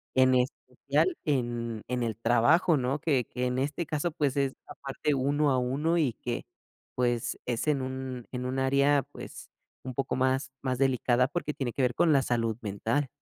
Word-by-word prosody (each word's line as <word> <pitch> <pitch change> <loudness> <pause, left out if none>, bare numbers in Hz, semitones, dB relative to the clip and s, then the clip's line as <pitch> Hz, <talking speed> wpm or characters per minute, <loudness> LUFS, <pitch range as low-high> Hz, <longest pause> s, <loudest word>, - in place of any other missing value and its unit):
en 130 0 +5
especial 130 - 0
en 120 -5 -1
en 125 0 -1
el 115 -2 -2
trabajo, 120 +9 +4
¿no?, 130 +2 -1
que 135 -5 +1
que, 125 0 -3
en 125 0 0
este 145 +5 -1
caso, 155 +3 -1
pues, 145 -3 -1
es 135 -1 +1
aparte 140 +2 -3
uno 140 +2 +2
a 130 - +2
uno 145 +7 0
y 145 -8 +2
que, 120 +1 -4 0.5
pues, 120 -2 0
es 120 +3 -2
en 145 -3 +2
un 130 -2 -5
en 125 0 -4
un 130 +1 -2
área, 140 +1 +3
pues, 145 - -10 0.3
un 130 - -5
poco 135 +2 -1
más 130 +1 +1
más 130 -2 -1
delicada 125 -2 +3
porque 150 0 -3
tiene 125 -5 -3
que 135 - 0
ver 125 -1 +2
con 165 +5 +3
la 140 -3 +4
salud 115 -3 0
mental. 115 +6 -1
130 Hz, 185 wpm, -29 LUFS, 125-145 Hz, 0.5 s, en